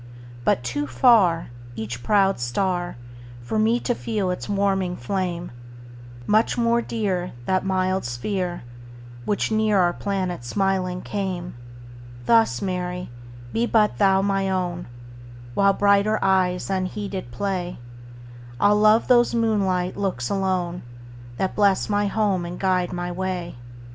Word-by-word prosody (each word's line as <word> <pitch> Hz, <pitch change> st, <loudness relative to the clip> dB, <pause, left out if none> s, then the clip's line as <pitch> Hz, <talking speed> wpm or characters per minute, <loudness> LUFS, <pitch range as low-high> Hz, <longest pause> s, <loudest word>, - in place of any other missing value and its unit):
But 120 Hz, -, +2 dB
too 145 Hz, +5 st, -2 dB
farEach 120 Hz, -, +1 dB
proud 195 Hz, -, +2 dB
star, 175 Hz, +7 st, -1 dB, 0.5 s
For 215 Hz, -, -1 dB
me 225 Hz, +2 st, +3 dB
to 245 Hz, -, 0 dB
feel 210 Hz, -5 st, -2 dB
its 180 Hz, -, -5 dB
warming 195 Hz, -3 st, 0 dB
flame; 175 Hz, +5 st, -3 dB, 0.7 s
Much 215 Hz, -, +2 dB
more 235 Hz, 0 st, +2 dB
dear, 195 Hz, -7 st, -2 dB
That 185 Hz, +5 st, +1 dB
mild 185 Hz, 0 st, 0 dB
sphere, 175 Hz, -, -3 dB, 0.6 s
Which 205 Hz, -, 0 dB
near 215 Hz, -1 st, +2 dB
our 175 Hz, -2 st, +3 dB
planet 185 Hz, -9 st, -3 dB
smiling 185 Hz, +5 st, -1 dB
came; 185 Hz, -4 st, -4 dB, 0.7 s
Thus, 225 Hz, -, +3 dB
Mary, 180 Hz, -3 st, -3 dB, 0.4 s
be 235 Hz, +1 st, +1 dB
but 215 Hz, -3 st, +2 dB
thou 195 Hz, -1 st, +4 dB
my 195 Hz, -1 st, 0 dB
own; 180 Hz, -2 st, -2 dB, 0.7 s
While 200 Hz, +4 st, +4 dB
brighter 200 Hz, +2 st, +3 dB
eyes 185 Hz, -1 st, +1 dB
unheeded 190 Hz, -, -3 dB
play, 180 Hz, +6 st, -3 dB, 0.8 s
I'll 205 Hz, +1 st, +4 dB
love 215 Hz, +2 st, +4 dB
those 240 Hz, -1 st, +4 dB
moonlight 195 Hz, -6 st, +1 dB
looks 185 Hz, -12 st, -2 dB
alone, 185 Hz, -3 st, -1 dB, 0.6 s
That 190 Hz, -, -1 dB
bless 200 Hz, -2 st, +2 dB
my 205 Hz, 0 st, +1 dB
home 200 Hz, -3 st, 0 dB
and 175 Hz, +1 st, -6 dB
guide 185 Hz, -2 st, +1 dB
my 175 Hz, 0 st, -3 dB
way. 180 Hz, -2 st, -4 dB
190 Hz, 125 wpm, -23 LUFS, 175-205 Hz, 0.8 s, thou